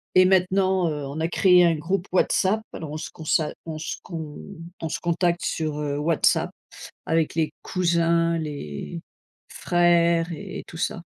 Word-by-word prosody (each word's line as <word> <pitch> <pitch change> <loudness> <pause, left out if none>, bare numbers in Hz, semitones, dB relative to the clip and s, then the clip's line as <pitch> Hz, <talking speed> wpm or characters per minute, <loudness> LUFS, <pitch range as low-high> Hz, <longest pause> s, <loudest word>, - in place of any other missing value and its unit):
Et 185 0 +7
maintenant, 185 -1 +3
heu, 150 -2 -4
on 140 +3 -6
a 160 - +1
créé 180 0 +5
un 165 -1 +3
groupe 180 +5 -2
WhatsApp. 190 +3 +2
Alors, 155 -2 -6
on 155 - -4
se 155 - -6
consa 155 0 0
on 160 -1 -5
se 155 - -4
con 160 -4 -7 0.4
on 165 - -3
se - - -3
contacte 175 0 0
sur, 155 -2 -2
heu, 145 -1 -2
WhatsApp 160 +1 +2 0.6
avec 160 -1 +1
les 160 -2 0
cousins, 170 -2 +1
les 145 - -5 0.5
frères 170 -1 +2
et 155 - -7
et - - -12
tout - - -11
ça. - - -2
165 Hz, 165 wpm, -24 LUFS, 155-175 Hz, 0.6 s, Et